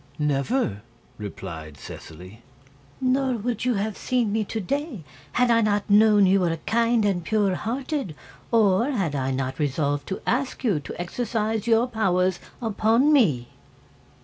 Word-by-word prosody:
"Never," 150 - 0 0.4
replied 80 -7 -7
Seseley. 90 - -11 0.6
"Nor 260 0 +1
would 235 +1 -3
you 250 -2 +2
have 205 +1 -2
seen 245 -5 0
me 220 +1 +1
to 220 - -4
day, 275 - -3 0.3
had 245 -1 +3
I 230 0 +4
not 205 -1 0
known 210 -1 +6
you 190 +1 +4
were 170 -3 0
kind 230 -1 +2
and 185 -4 0
pure 205 -1 +1
hearted, 250 - -3 0.4
or 225 +1 +3
had 195 - -1
I 135 -2 -1
not 130 0 -3
resolved 145 0 -1
to 190 - -3
ask 260 +2 -1
you 205 -11 +2
to 145 - -9
exercise 220 +3 -2
your 230 +1 +4
powers 185 -6 +1 0.2
upon 225 +6 +3
me." 150 - +3
210 Hz, 150 wpm, -24 LUFS, 155-235 Hz, 0.6 s, known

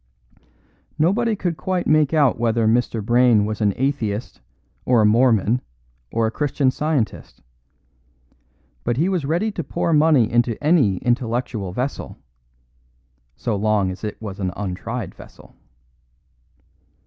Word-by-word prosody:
Nobody 215 +8 +2
could 175 -5 -3
quite 185 -1 -2
make 155 -2 +3
out 145 -7 +2
whether 115 -1 +1
Mr. 115 -1 +1
Brayne 120 -2 +4
was 110 +1 -4
an 105 -1 +3
atheist 120 -5 -2 0.4
or 125 -2 +3
a 110 - +4
Mormon 115 +1 +3 0.5
or 115 0 +1
a 110 - -1
Christian 140 0 0
Scientist; 145 - -3 1.4
but 120 - -1
he 165 +6 +2
was 180 -6 -1
ready 175 +9 0
to 170 - -5
pour 165 - -1
money 150 -6 +4
into 120 -1 +1
any 145 - +3
intellectual 120 -4 -2
vessel, 125 +8 -4 1.2
so 105 - -2
long 100 -2 +1
as 90 - -10
it 105 -1 -5
was 105 -3 -7
an 95 -2 -2
untried 100 +2 -5
vessel. - - -16
120 Hz, 130 wpm, -21 LUFS, 110-150 Hz, 1.4 s, Brayne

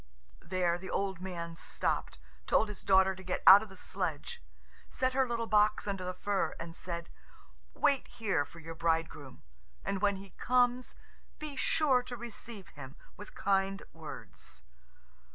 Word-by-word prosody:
There 175 0 0
the 190 - -8
old 190 -3 -1
man 170 -3 -5
stopped, - - -2 0.3
told 220 - +3
his 210 - -7
daughter 190 0 +5
to 190 - -11
get 180 -1 -3
out 195 +2 +11
of 220 - -8
the 190 - -13
sledge, 165 -6 -4 0.5
set 255 0 0
her 265 0 +3
little 235 -1 -1
box 210 -1 +3
under 195 -2 -2
the 180 0 -4
fir, 200 +1 -1
and 165 0 -7
said, 170 -2 -5 0.6
"Wait 280 -3 +2
here 195 -9 0
for 170 - -15
your 165 0 -7
bridegroom, 160 -5 -2 0.4
and 195 -1 -1
when 205 -1 +3
he 195 0 -10
comes 250 0 +1 0.4
be 305 -2 -6
sure 270 -3 +3
to 245 0 -7
receive 230 -4 -8
him 135 -1 -10 0.2
with 205 - -11
kind 195 0 +1
words." 65 - -9
195 Hz, 155 wpm, -32 LUFS, 170-225 Hz, 0.6 s, out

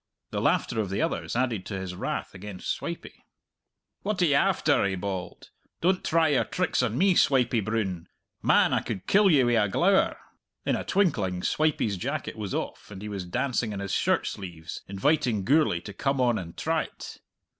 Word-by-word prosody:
The - - -2
laughter 110 - +1
of 100 - -3
the 95 - -2
others 85 +3 -1
added 120 -6 0
to 95 -3 -4
his 95 -1 -5
wrath 90 - -4
against 95 -1 -5
Swipey. - - -6 0.8
"What 210 -1 -2
are - - +6
you 150 - +3
after?" 140 - +3
he 95 -1 0
bawled. 95 -1 -5 0.3
"Don't 185 +2 +1
try 165 -1 +3
your 140 - +3
tricks 180 -6 0
on 120 -1 -1
me, 190 +4 +4
Swipey 125 -7 +3
Broon. 100 -5 -2 0.3
Man, - - +4
I - - +3
could 95 - -5
kill 205 0 +5
ye 145 -6 +5
wi' 120 -3 +3
a 105 - 0
glower!" 190 - +3 0.5
In - - +2
a - - -3
twinkling 100 - +1
Swipey's 150 -10 +1
jacket 140 +8 -3
was 105 -4 -4
off, - - -5
and 100 -1 -9
he 105 - -5
was 100 -3 -4
dancing 120 +2 -1
in 100 - -4
his 100 -1 -4
shirt - - +2
sleeves, 85 -3 -6
inviting 120 +1 +1
Gourlay 140 - +3
to 100 - -8
come 135 +4 -1
on 120 -3 +2
and 85 -2 -9
try't. 160 -2 -3
110 Hz, 190 wpm, -27 LUFS, 95-145 Hz, 0.8 s, are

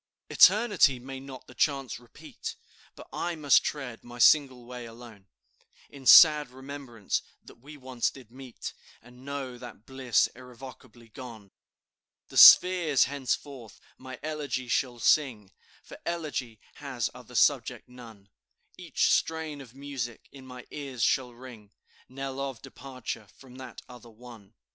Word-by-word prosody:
"Eternity 205 - +5
may 130 +2 -9
not 130 -1 -11
the - - -15
chance 135 -6 -1
repeat, 120 -1 -10 0.4
But - - -13
I 175 0 -3
must 150 -3 +4
tread 135 -6 -6
my 120 0 -12
single 130 -1 +4
way 125 -1 -9
alone, 115 -4 -14 0.6
In 135 -2 -10
sad 150 -4 +8
remembrance 130 -4 -5 0.2
that - - -17
we 145 +4 -13
once 130 -3 -2
did 125 -4 -15
meet, 130 -2 -9 0.3
And 125 +1 -17
know 135 -3 -6
that 120 -3 -12
bliss 130 -4 +1
irrevocably 125 -2 -14
gone. 110 -4 -11 0.8
"The - - -8
spheres 175 -6 +8
henceforth 135 -4 -5 0.2
my 130 0 -11
elegy 150 -5 -4
shall 120 0 -1
sing, 115 -6 +1 0.3
For - - -13
elegy 145 -9 -4 0.2
has 130 -5 -4
other - - -14
subject - - +1
none; 115 -5 -15 0.5
Each - - 0
strain 160 -3 -1
of 125 -2 -15
music 135 -4 -7
in 135 -2 -14
my 125 -1 -11
ears 135 -6 -5
shall 125 +2 +1
ring 120 -4 -14 0.4
Knell 135 +1 -6
of 135 -3 -5
departure 130 -5 -8
from 130 -2 -15
that 130 -3 -10
other 125 -1 -14
one. 115 -2 -15
130 Hz, 140 wpm, -27 LUFS, 120-140 Hz, 0.8 s, sad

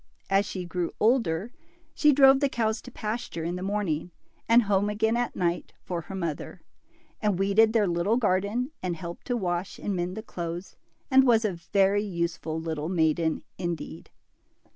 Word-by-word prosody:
As 195 +1 +3
she 185 -2 -5
grew 175 -1 -2
older 220 -4 +2 0.4
she 300 - +4
drove 270 -1 +7
the 280 -1 +2
cow' 225 -4 +1
to 225 +3 -7
pasture 215 -7 -4
in 170 +2 -2
the 180 - -5
morning, 190 -5 -1 0.4
and 235 +1 +7
home 205 0 +1
again 220 +2 +1
at 240 0 -1
night, 175 -1 -1
for 175 -2 -3
her 185 +4 -8
mother; 170 0 -4 0.6
and 210 -4 +1
weeded 200 +3 +4
their 220 -2 +3
little 175 +5 +1
garden, 215 +4 0
and 180 -2 -2
helped 170 +1 -8
to 245 - 0
wash 180 -2 -2
and 205 - -3
mend 180 +2 -3
the 220 - -5
clothes, 175 -2 -6 0.4
and 265 0 +7
was 225 -2 +4
a 205 - 0
very 195 +3 +2
use 170 -4 -2
ful 160 0 -4
little 160 -1 -3
maiden, 160 -2 +1 0.2
indeed. 175 -2 -5
195 Hz, 175 wpm, -27 LUFS, 175-220 Hz, 0.6 s, drove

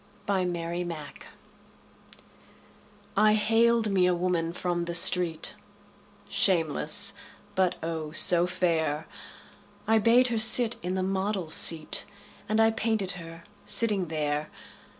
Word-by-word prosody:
My 195 -2 -1
Madonna 170 -3 -6 2.1
I 215 +1 +3
haled 225 +1 +1
me 185 -2 +1
a 180 - 0
woman 175 -2 -2
from 175 0 -4
the 170 0 -4
street, 170 -1 +1 0.7
Shameless, 190 +3 +2 0.4
but, 185 -1 0
oh, 160 -2 -5
so 175 +2 +5
fair! 160 -4 -2 0.8
I 225 0 +2
bade 240 +3 +3
her 230 -2 -2
sit 230 +1 +6
in 180 +2 -4
the 190 - -2
model's 190 -3 -3
seat 160 -2 +3 0.4
And 215 +1 0
I 225 0 +3
painted 220 -4 -2
her 165 -2 -11 0.2
sitting 205 -6 +3
there. 150 -1 -4
180 Hz, 115 wpm, -26 LUFS, 165-210 Hz, 2.1 s, sit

